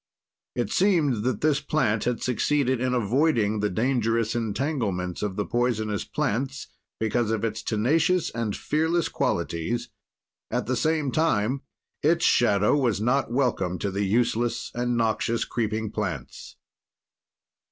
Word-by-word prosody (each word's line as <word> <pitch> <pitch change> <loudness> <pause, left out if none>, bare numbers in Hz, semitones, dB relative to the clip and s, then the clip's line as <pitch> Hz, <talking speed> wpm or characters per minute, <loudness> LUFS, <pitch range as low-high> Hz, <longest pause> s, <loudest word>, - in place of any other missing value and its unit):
It 120 - -1
seemed 160 - +2
that 125 -4 -1
this 150 -1 +2
plant 115 -7 0
had 125 -1 -1
succeeded 130 0 +1
in 130 0 +1
avoiding 115 -2 +2
the 105 0 +1
dangerous 115 0 +1
entanglements 110 - -2
of 105 -3 -2
the 105 - -1
poisonous 110 -4 -1
plants 135 -1 -2 0.3
because 110 +1 0
of 110 -1 -1
its 110 -1 -3
tenacious 155 +11 +1
and 115 -3 -2
fearless 160 +2 0
qualities, 115 +9 -2 0.6
at - - -1
the - - 0
same 155 -4 +1
time 135 -4 +1 0.4
its 165 +3 +3
shadow 105 -1 +4
was 125 -8 +1
not 125 +3 +1
welcome 120 -9 0
to 100 - -2
the 100 +2 -1
useless 115 +3 0
and 120 0 -1
noxious 115 0 0
creeping 110 -2 -2
plants. - - -5
120 Hz, 130 wpm, -26 LUFS, 105-140 Hz, 0.6 s, shadow